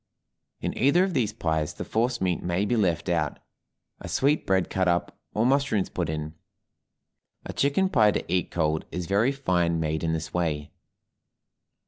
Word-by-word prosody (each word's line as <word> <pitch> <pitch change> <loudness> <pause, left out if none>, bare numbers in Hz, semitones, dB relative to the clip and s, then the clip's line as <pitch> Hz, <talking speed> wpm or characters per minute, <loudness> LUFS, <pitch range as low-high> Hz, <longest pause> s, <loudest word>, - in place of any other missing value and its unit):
In - - -2
either 150 +7 +4
of 190 -1 -1
these 120 -8 +1
pies 80 -7 -1
the - - -5
force 120 +2 0
meat 90 -2 0
may 90 +3 0
be 120 - +1
left 90 -6 +1
out, 85 -2 0 0.6
a - - -8
sweetbread 115 - +1
cut 95 -1 0
up, 85 0 0 0.2
or 110 - +2
mushrooms 130 -7 +2
put 85 -3 -2
in. 80 0 -4 1.1
A - - -6
chicken 145 +8 +2
pie 110 - +4
to - - -1
eat 90 +1 0
cold 80 -2 0
is 90 -1 -3
very 105 +8 +2
fine 90 -11 0
made 80 0 -1
in 80 - +1
this 80 0 -4
way. 75 -4 -1
95 Hz, 165 wpm, -26 LUFS, 85-120 Hz, 1.1 s, either